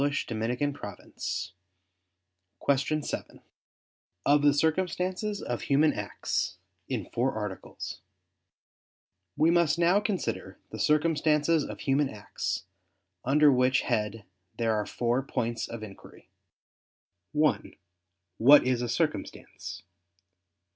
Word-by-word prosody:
________________________ 120 -7 -2 1.1
QUESTION 140 +2 +1
7 - - -5 0.8
OF 145 0 +5
THE 145 0 +5
CIRCUMSTANCES 185 +6 0
OF 120 - -3
HUMAN 150 +2 +3
ACTS - - -2 0.3
(In - - -2
Four 125 +1 +1
Articles) 105 -3 -6 1.4
We 160 +2 +4
must 170 -2 +3
now 175 +3 +4
consider 115 - -3
the 110 - -7
circumstances 150 +3 +3
of - - -7
human 140 0 +2
acts: 105 -4 -4 0.6
under 145 +3 +5
which 130 +1 +3
head 105 0 -1 0.3
there 115 -1 +1
are 105 -1 -1
four 120 +2 0
points 120 -3 -2
of 115 -2 -7
inquiry: 100 -3 -13 1.0
(1) 150 0 +1 0.6
What 140 +5 +8
is 125 -2 +1
a 120 - -2
circumstance? 120 - -3
140 Hz, 100 wpm, -28 LUFS, 115-155 Hz, 1.4 s, What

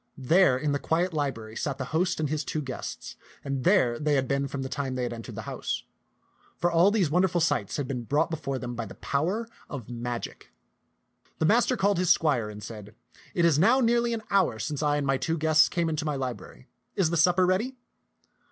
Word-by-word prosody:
There 140 +1 +4
in 145 +2 -1
the 140 - 0
quiet 170 +4 0
library 125 -8 -3
sat 140 +1 -3
the 130 - -4
host 180 +2 +1
and 155 - 0
his 150 +1 -2
two 155 - -3
guests, 130 -2 -7 0.3
and 135 -2 -2
there 130 -11 +3
they 150 -1 +1
had 135 -1 +1
been 140 0 0
from 135 0 -4
the - - -3
time 135 -1 -3
that 125 -1 -1
they 120 - -5
entered 115 - -9
the - - -6
house; - - -4 0.7
for 175 - +1
all 170 +3 +5
these 200 -8 +1
wonderful 180 +1 +2
sights 120 - 0
had 145 -3 -2
been 125 -3 -4
brought 150 +7 +1
be 160 - -2
fore 135 -3 -3
them 125 -1 -5
by 115 -2 -4
the - - -11
power 185 +11 -1 0.2
of 125 -5 -7
magic. 120 0 -5 0.9
The 160 - +1
master 240 +6 +3
called 200 -2 +2
his 180 -2 +1
squire 140 -11 +3
and 105 0 -9
said, 105 -1 -9 0.2
" - - -24
It 170 - +3
is 155 -4 +4
now 235 +10 +5
nearly 235 -1 +2
an 220 - -6
hour 190 - +3
since 140 +7 -3
I 145 -1 +2
and 145 - -1
my 135 -1 +2
two 165 +4 -1
guests 155 0 +4
came 170 -2 0
into 155 -1 -1
my 150 -2 -1
library. 125 - -6 0.3
Is 175 -5 +2
the - - 0
supper 180 +3 +4
ready 205 +9 0
150 Hz, 225 wpm, -27 LUFS, 130-175 Hz, 0.9 s, all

